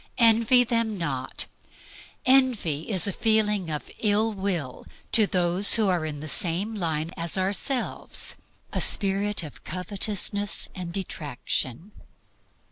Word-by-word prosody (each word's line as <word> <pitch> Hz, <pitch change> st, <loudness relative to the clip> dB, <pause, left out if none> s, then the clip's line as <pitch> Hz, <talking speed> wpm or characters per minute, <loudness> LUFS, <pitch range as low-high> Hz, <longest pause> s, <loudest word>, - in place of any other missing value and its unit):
Envy 230 Hz, +1 st, +5 dB
them 230 Hz, -3 st, -1 dB
not. 135 Hz, -6 st, -2 dB, 0.8 s
Envy 245 Hz, -, +2 dB
is 195 Hz, -3 st, +2 dB
a 200 Hz, -, -1 dB
feeling 210 Hz, -5 st, +1 dB
of 150 Hz, -1 st, -5 dB
ill 215 Hz, +1 st, +1 dB
will 185 Hz, -10 st, -4 dB, 0.3 s
to 215 Hz, -3 st, +4 dB
those 180 Hz, +2 st, +4 dB
who 215 Hz, -3 st, +2 dB
are 170 Hz, -4 st, 0 dB
in 145 Hz, -2 st, -6 dB
the 155 Hz, -, -7 dB
same 185 Hz, +6 st, -1 dB
line 165 Hz, -5 st, -3 dB
as 170 Hz, +2 st, -2 dB
ourselves, 200 Hz, +7 st, -3 dB, 0.4 s
a -, -, 0 dB
spirit 200 Hz, -1 st, +3 dB
of 150 Hz, -, -11 dB
covetousness 200 Hz, +3 st, +1 dB
and 180 Hz, -2 st, -6 dB
detraction. 155 Hz, -, -4 dB
195 Hz, 125 wpm, -25 LUFS, 165-215 Hz, 0.8 s, Envy